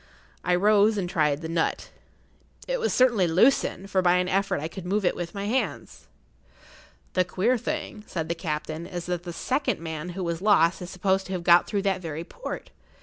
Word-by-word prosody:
I 180 - +2
rose 210 +3 +4
and 190 -3 -1
tried 150 -5 +1
the - - -3
nut. 165 0 -1 0.8
It - - -1
was 460 - 0
certainly 240 -8 +4
loosened, 195 +2 +2
for 190 - +3
by 180 -1 +4
an 180 0 +1
effort 195 -1 0
I 155 - -3
could 185 +2 -8
move 195 +3 0
it - - +2
with 175 +2 -5
my 200 0 -3
hands. 245 +6 -3 1.1
"The 185 - +3
queer 195 +7 +1
thing," 245 -4 -4
said 160 -3 -3
the 170 - 0
captain, 160 0 -4
"is 175 -2 -5
that 180 0 -3
the 175 - -4
second 260 - -1
man 160 +1 -5
who 190 - -2
was 170 0 -3
lost 190 -4 +4
is 180 - -6
supposed 190 +1 0
to 190 - -5
have 180 -2 -3
got 175 0 +6
through 200 -2 -1
that 190 -2 0
very 160 -1 -5
port. - - -7
180 Hz, 205 wpm, -26 LUFS, 170-205 Hz, 1.1 s, got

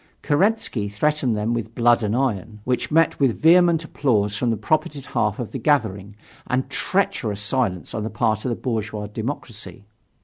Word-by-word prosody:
Kerensky 165 - +1
threatened 130 +2 0
them 110 +3 -1
with 115 -1 -4
blood 120 0 +4
and 105 0 0
iron, 115 -4 -1
which 125 +1 -1
met 165 +1 +3
with 135 -5 +2
vehement 170 0 +5
applause 105 -10 0
from 120 +3 0
the 115 - 0
propertied 155 -1 -1
half 105 -1 -1
of 120 - -5
the 135 - -4
gathering, 105 -8 0 0.3
and 130 +1 0
treacherous 120 - -1
silence 100 -5 -1
on 110 - -2
the 110 - -3
part 110 -1 0
of - - -1
the 120 - -1
bourgeois 110 -4 -3
democracy. 105 -3 -6
120 Hz, 170 wpm, -22 LUFS, 105-145 Hz, 0.3 s, vehement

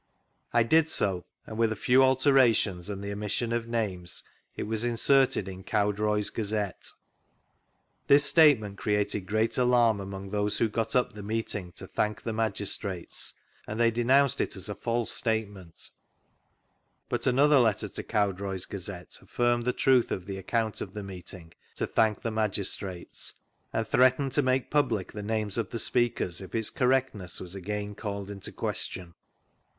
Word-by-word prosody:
I 120 -1 +4
did 160 +6 +3
so, 95 - 0 0.2
and 110 0 -7
with 115 -1 +3
a - - -1
few 125 +5 +4
alterations 130 -8 +3
and 100 -1 -5
the 100 - -4
omission 105 +3 -2
of 115 -1 -2
names 100 -7 -2 0.3
it - - -2
was 110 +1 -1
inserted 120 -2 +2
in 95 0 -8
Cowdroy's 105 +1 0
Gazette. 105 -3 -3 1.2
This 140 +1 +6
statement 135 - +4
created 105 -3 0
great 110 +4 0
alarm 120 -4 +4
among 95 0 -7
those 105 0 0
who 115 - +2
got 115 +3 -2
up 125 - +2
the 105 - -8
meeting 105 -3 -3
to - - -9
thank 105 0 -2
the 115 - -3
magistrates, 100 -4 -2 0.3
and 105 +2 -5
they 115 -1 +4
denounced 130 +4 +3
it - - -2
as 95 0 -2
a - - -2
false 115 +1 -2
statement, 105 - -3 1.2
but - - -1
another 140 +3 +5
letter 110 -3 +2
to - - -6
Cowdroy's 100 -3 -1
Gazette 95 -2 -7
affirmed 120 -1 0
the 125 - +2
truth 130 -1 +3
<rf 90 - -3
the 95 -1 -5
account 110 +3 -1
of 95 - -6
the 105 - -5
meeting 90 -3 -9 0.2
to - - -1
thank 110 -2 +1
the 115 - -1
magis 105 -3 +1
trates, 90 -3 -5 0.4
and 110 -1 -1
threatened 130 +3 +3
to 145 - +2
make 130 -1 0
public 125 -10 +1
tbe 105 -1 -6
names 110 -1 -1
of 110 -5 -2
the - - -4
speakers 115 -7 +1
if 95 - -8
its 110 -1 +3
correctness 125 -8 0
was 90 0 -8
agaia 105 +2 -4
called 100 -2 -5
in 100 - -8
question. 90 -1 -4
110 Hz, 165 wpm, -28 LUFS, 100-120 Hz, 1.2 s, This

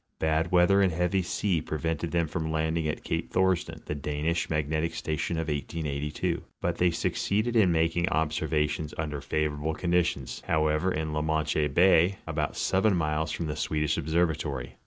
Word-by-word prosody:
Bad 80 +2 0
weather 90 +2 +5
and 95 -2 +3
heavy 90 +3 +1
sea 90 -1 0
prevented 80 +1 -2
them 85 0 +1
from 80 +1 -3
landing 80 0 0
at 75 - -3
cape 80 0 -3
Thorsden, 90 -4 0
the - - -3
Danish 75 +3 -2
magnetic 80 +1 -1
station 80 +2 -2
of 80 -1 -2
1882, 75 -1 -2 0.2
but - - -2
they 90 - +4
suc 85 - -1
ceeded 110 +4 0
in 100 -6 +5
making 80 +2 +1
observations 80 0 -1
under 75 -2 -3
favorable 75 +1 -1
conditions, 85 -6 0
how 80 -1 +2
ever, 75 +5 +1
in 80 -2 -2
la 75 - 0
Manche 80 -1 +1
bay, 90 +3 +4
about 75 -2 -2
7 95 +1 +2
miles 80 -1 0
from 85 - -3
the 75 -1 -3
Swedish 75 0 0
observ 85 +3 +1
atory. 70 -5 -4
80 Hz, 170 wpm, -28 LUFS, 75-85 Hz, 0.2 s, weather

